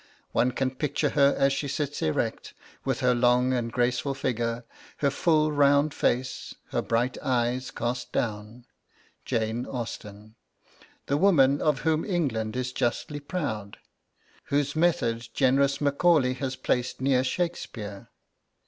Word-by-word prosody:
One 125 - +2
can 130 +1 -1
picture 145 +2 -1
her 140 -1 +4
as 135 0 +3
she 140 +1 -2
sits 145 +1 -3
erect, 80 - -2 0.3
with 135 0 -1
her 125 -1 +4
long 125 +1 +3
and 120 -2 -1
graceful 125 +3 0
figure, 120 -2 -2 0.3
her 140 -1 +1
full 155 0 +2
round 145 0 +3
face, 130 +2 -1 0.2
her - - 0
bright 120 +2 0
eyes 125 -1 0
cast 120 -1 -3
down, 110 +2 -3 0.6
Jane 115 +2 -1
Austen, 110 -3 -7 0.7
'the 140 - +1
woman 145 -7 +4
of 150 -4 +1
whom 160 0 +1
England 125 - -1
is 125 0 -2
justly 145 +5 -1
proud' 140 - -4 0.7
whose 145 +1 0
method 155 -9 +1
generous 140 +1 +3
Macaulay 145 -2 +3
has 130 0 -3
placed 125 -1 -1
near 130 -1 +2
Shakespeare. 130 - -4
130 Hz, 130 wpm, -27 LUFS, 120-145 Hz, 0.7 s, her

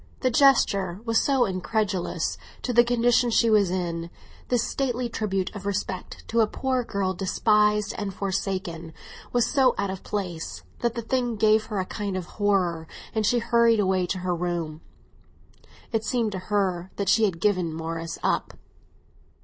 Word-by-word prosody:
The 255 - +2
gesture 200 -9 +3
was 230 -1 +3
so 270 -3 +3
incongruous 190 -1 -1 0.3
to 250 - -1
the 240 +1 +7
condition 245 0 +3
she 230 0 +3
was 205 -4 +4
in, 170 -2 -3 0.4
this 245 -2 +1
stately 250 -3 -1
tribute 195 -4 -2
of 200 -1 -6
respect 190 -2 -4
to 230 - +1
a 220 - +5
poor 260 +2 -1
girl 195 -4 -1
despised 210 +2 +2
and 205 -2 -3
forsaken 185 -4 -3 0.4
was 245 -1 +3
so 265 -3 +3
out 200 -1 -1
of 190 - -6
place, 165 - -4 0.2
that 235 0 -1
the 235 - -3
thing 245 0 0
gave 215 0 +3
her 210 -3 -2
a 185 - -1
kind 200 -1 -4
of 180 - -4
horror, 180 -6 0 0.3
and 220 -2 +1
she 245 - +3
hurried 235 -1 +3
away 185 -2 +1
to 185 - -2
her 180 - +1
room. 170 -3 -3 1.1
It 225 -2 0
seemed 230 -3 0
to 190 - -4
her 190 -3 0
that 200 - -3
she 220 +3 +5
had 180 -5 -2
given 185 -4 +1
Morris 165 +1 -4
up. - - 0
205 Hz, 165 wpm, -25 LUFS, 185-230 Hz, 1.1 s, the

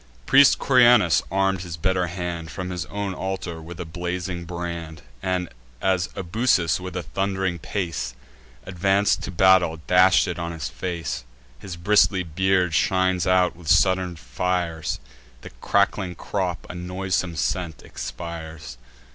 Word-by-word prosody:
Priest 140 0 +6
Corynaeus, 120 - +5
arm'd 95 -1 +1
his 85 -3 -6
better 90 +1 +1
hand, 85 -2 -4
From 90 +1 -5
his 90 -6 -4
own 100 +5 -3
altar, 95 -3 -4
with 80 +1 -10
a 85 - -4
blazing 90 +1 -4
brand; 85 -2 -6 0.2
And, 90 -1 -1 0.3
as 95 -2 +1
Ebusus 95 -3 +1
with 90 0 -6
a 90 - -3
thund'ring 95 -2 -2
pace 85 -10 -3 0.5
Advanc'd 95 +2 +1
to - - -5
battle, 90 -3 +4
dash'd 90 +1 +5
it 90 -1 -4
on 85 0 -3
his 80 -6 -4
face: 85 -9 -4 0.4
His 90 +6 -7
bristly 95 +1 +3
beard 90 +1 +1
shines 95 0 +2
out 90 -1 +3
with 85 -2 -14
sudden 95 +1 +3
fires; 80 +4 -2 0.4
The - - -10
crackling 100 -2 +1
crop 90 -1 -3
a - - -7
noisome 90 0 -2
scent 85 -1 -2
expires. 80 -6 -7
90 Hz, 140 wpm, -24 LUFS, 85-95 Hz, 0.5 s, Priest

